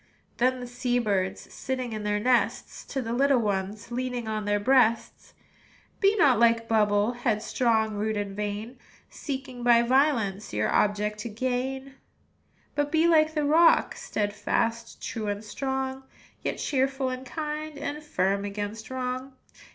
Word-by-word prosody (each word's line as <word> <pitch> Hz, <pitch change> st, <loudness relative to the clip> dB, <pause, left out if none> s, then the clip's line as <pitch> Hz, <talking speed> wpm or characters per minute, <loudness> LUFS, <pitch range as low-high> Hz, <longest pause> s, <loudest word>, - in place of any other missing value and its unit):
Then 255 Hz, +2 st, +3 dB
said 255 Hz, -, -8 dB
the -, -, -6 dB
sea 245 Hz, 0 st, -1 dB
birds, 200 Hz, -5 st, -1 dB
Sitting 255 Hz, -3 st, -3 dB
in 215 Hz, -, -4 dB
their 210 Hz, 0 st, 0 dB
nests, 245 Hz, +2 st, 0 dB
To 270 Hz, -2 st, -3 dB
the 230 Hz, 0 st, -3 dB
little 275 Hz, +2 st, +3 dB
ones 205 Hz, 0 st, -2 dB
Leaning 245 Hz, -1 st, -3 dB
on 215 Hz, -1 st, -2 dB
their 205 Hz, 0 st, +1 dB
breasts, 230 Hz, 0 st, +2 dB, 0.6 s
"Be 400 Hz, 0 st, +4 dB
not 280 Hz, -, +4 dB
like 230 Hz, -1 st, +3 dB
Bubble, 210 Hz, -1 st, +3 dB
Headstrong, 225 Hz, -1 st, 0 dB
rude, 215 Hz, +1 st, -1 dB
and 200 Hz, -1 st, -3 dB
vain, 210 Hz, +4 st, -4 dB, 0.3 s
Seeking 265 Hz, -3 st, -6 dB
by 240 Hz, -1 st, +5 dB
violence 235 Hz, -, +1 dB
Your 105 Hz, 0 st, 0 dB
object 210 Hz, +1 st, +1 dB
to 230 Hz, -, -5 dB
gain; 260 Hz, +4 st, -3 dB, 0.8 s
"But 290 Hz, 0 st, -1 dB
be 325 Hz, +1 st, +4 dB
like 315 Hz, -1 st, +4 dB
the 300 Hz, -1 st, +1 dB
rock, 325 Hz, +3 st, +4 dB
Steadfast, 215 Hz, +2 st, -2 dB
true, 220 Hz, -2 st, -4 dB
and 205 Hz, +1 st, -3 dB
strong, 265 Hz, +3 st, -3 dB, 0.4 s
Yet -, -, -2 dB
cheerful 270 Hz, -1 st, 0 dB
and 255 Hz, 0 st, -5 dB
kind, 305 Hz, 0 st, -5 dB
And 290 Hz, +1 st, -4 dB
firm 200 Hz, -8 st, 0 dB
against 205 Hz, +2 st, -5 dB
wrong. 255 Hz, +1 st, -4 dB
240 Hz, 150 wpm, -27 LUFS, 210-265 Hz, 0.8 s, by